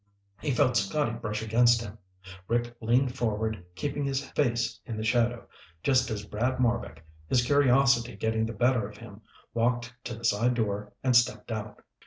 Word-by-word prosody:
He 150 - -3
felt 125 -1 +2
Scotty 110 +7 0
brush 110 -2 -4
against 120 +2 +4
him. 105 0 -9 0.5
Rick 120 0 -1
leaned 125 +3 +2
forward, 110 -5 -2
keeping 145 +3 -2
his 135 -1 -1
face 115 -4 0
in 115 -3 -6
the 110 - -3
shadow, 120 +1 +1 0.4
just 130 -2 +3
as 105 -2 -4
Brad 120 +5 -1
Marbek, 115 - -1 0.2
his 120 +4 +2
curiosity 135 -4 +3
getting 110 +1 0
the 115 - -5
better 120 -1 +2
of 105 - -14
him, 110 -2 -12 0.3
walked 120 +1 0
to 120 - -4
the 115 +1 -7
side 115 +3 +2
door 105 -2 -2
and 130 -2 +3
stepped 120 0 +2
out. 110 -1 -6
115 Hz, 170 wpm, -28 LUFS, 110-125 Hz, 0.5 s, against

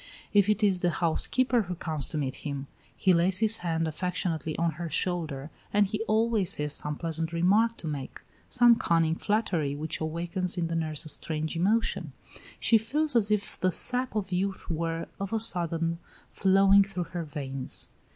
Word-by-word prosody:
If 205 -1 +4
it 210 +1 +1
is 195 -3 +3
the 175 - +1
housekeeper 235 +9 +1
who 180 -3 -5
comes 155 -4 -5
to 155 - -4
meet 135 -3 -2
him, 140 -2 -4 0.3
he 185 - +3
lays 180 +2 +5
his 220 +1 +3
hand 165 -2 -1
affectionately 160 -1 -3
on 170 0 +1
her 170 - -3
shoulder, 160 -4 -2 0.2
and 205 0 +3
he 210 +2 -3
always 220 -3 +2
has 150 0 -2
some 150 0 -2
pleasant 165 0 -2
remark 205 +7 +2
to 165 - -7
make, 145 -3 -5 0.3
some 240 -2 +5
cunning 165 -4 +2
flattery 170 -7 -1
which 155 +3 -4
awakens 170 +3 -2
in 170 -1 -1
the 165 - -2
nurse 155 -1 -2
a - - -5
strange 155 +1 -1
emotion. 210 +7 0 0.5
She 225 - +4
feels 290 +6 +2
as 215 -3 +3
if 210 -1 -1
the 185 - +2
sap 250 +8 +1
of 195 -3 -2
youth 190 0 -2
were, 165 0 -2
of 195 +2 -4
a 225 - +1
sudden, 170 -5 +2 0.3
flowing 195 +1 +5
through 185 -3 -5
her 175 -1 -3
veins. 135 -3 -3
175 Hz, 180 wpm, -28 LUFS, 160-205 Hz, 0.5 s, lays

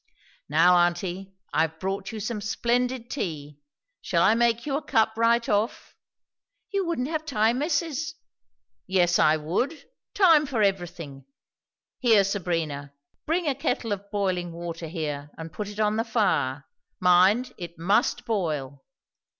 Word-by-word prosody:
"Now, 170 +4 +5
aunty, 175 +2 0 0.2
I've 160 0 0
brought 195 +1 -3
you 220 - -6
some 215 +1 -3
splendid 240 +3 -1
tea. 150 - -5 0.4
Shall - - +1
I - - +5
make 235 0 +1
you 280 -2 -1
a 290 - -1
cup, 220 -4 +2
right 230 +1 +2
off?" 210 +3 -1 0.8
"You 395 -3 0
wouldn't 265 -7 -1
have 315 0 -2
time 235 -4 +1
missus 315 0 -1 0.4
" - - -55 0.3
"Yes, 180 -2 +3
I 155 +1 +5
would! 245 - -2 0.3
Time 325 -7 +5
for 240 -6 0
everything. 170 -8 -3 0.7
Here, 225 -5 +5
Sabrina, 165 -8 -2 0.3
bring 340 +3 0
a 285 - +2
kettle 250 -4 -2
of 200 0 -4
boiling 185 -4 -1
water 170 -1 -6
here 150 -3 -4
and 160 -1 -8
put 210 - -4
it 210 +1 -9
on 215 0 +2
the 225 - +1
fire; 145 - 0 0.3
mind, 185 +7 +4
it 170 -1 -8
must 200 +7 +1
boil." 150 - -2
200 Hz, 145 wpm, -26 LUFS, 170-240 Hz, 0.8 s, Now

